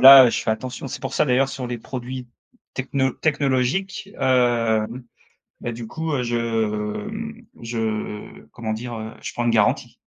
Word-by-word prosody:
là, 135 Hz, -2 st, +11 dB
je -, -, 0 dB
fais -, -, +1 dB
attention. 130 Hz, +4 st, -5 dB
C'est -, -, -6 dB
pour -, -, -3 dB
ça, -, -, +3 dB
d'ailleurs, 135 Hz, 0 st, +3 dB
sur 130 Hz, -2 st, -4 dB
les 120 Hz, 0 st, -3 dB
produits 125 Hz, +1 st, -6 dB, 0.4 s
techno 130 Hz, 0 st, 0 dB
technologiques, 145 Hz, +8 st, 0 dB
hem, 120 Hz, -2 st, +2 dB, 0.6 s
bah, 120 Hz, -, -3 dB
du 115 Hz, -1 st, -6 dB
coup, 160 Hz, +3 st, -3 dB
heu, 130 Hz, -3 st, +1 dB
je, 120 Hz, 0 st, 0 dB
mmh, 115 Hz, -, -2 dB, 0.2 s
je 110 Hz, -8 st, -3 dB
comment 110 Hz, -2 st, -3 dB
dire? 120 Hz, +2 st, -5 dB
Heu, 110 Hz, 0 st, -5 dB
je -, -, -4 dB
prends 120 Hz, -, -2 dB
une 120 Hz, -, +3 dB
garantie. 105 Hz, -3 st, +2 dB
125 Hz, 165 wpm, -23 LUFS, 115-135 Hz, 0.6 s, là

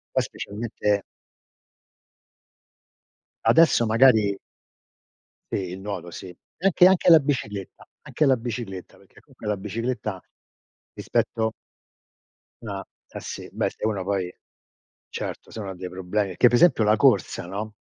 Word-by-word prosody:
Poi -, -, +3 dB
specialmente 105 Hz, -1 st, -2 dB, 2.4 s
Adesso 160 Hz, -7 st, +5 dB
magari 110 Hz, -3 st, +4 dB, 1.2 s
Sì 95 Hz, -2 st, -2 dB
il 95 Hz, -, -7 dB
nuoto 95 Hz, -4 st, -5 dB
sì, 95 Hz, -, -9 dB
e 90 Hz, -, -12 dB, 0.3 s
anche 180 Hz, -1 st, +6 dB
anche 185 Hz, -1 st, +4 dB
la 165 Hz, -, +10 dB
bicicletta, 115 Hz, -10 st, -4 dB
anche 155 Hz, -, -1 dB
la 135 Hz, -3 st, +4 dB
bicicletta 115 Hz, -6 st, -6 dB
perché 100 Hz, -, -21 dB
comunque 130 Hz, -6 st, -14 dB
la 105 Hz, -1 st, 0 dB
bicicletta, 105 Hz, 0 st, -3 dB, 0.8 s
rispetto 110 Hz, -1 st, -1 dB, 1.1 s
Ah, 100 Hz, -3 st, -5 dB, 0.2 s
eh -, -, -8 dB
sì, -, -, -7 dB
beh -, -, -1 dB
se -, -, -8 dB
uno 100 Hz, -4 st, -1 dB
poi 95 Hz, -2 st, -2 dB, 0.8 s
certo -, -, -6 dB
se -, -, -9 dB
uno 100 Hz, -2 st, -5 dB
ha -, -, -6 dB
dei 90 Hz, 0 st, -6 dB
problemi 95 Hz, +3 st, -2 dB
perché 90 Hz, +7 st, +3 dB
pre 120 Hz, -, +3 dB
esempio 130 Hz, -8 st, +5 dB
la 105 Hz, -, +4 dB
corsa, -, -, +2 dB
no, 105 Hz, +4 st, -5 dB
105 Hz, 135 wpm, -24 LUFS, 95-120 Hz, 2.4 s, la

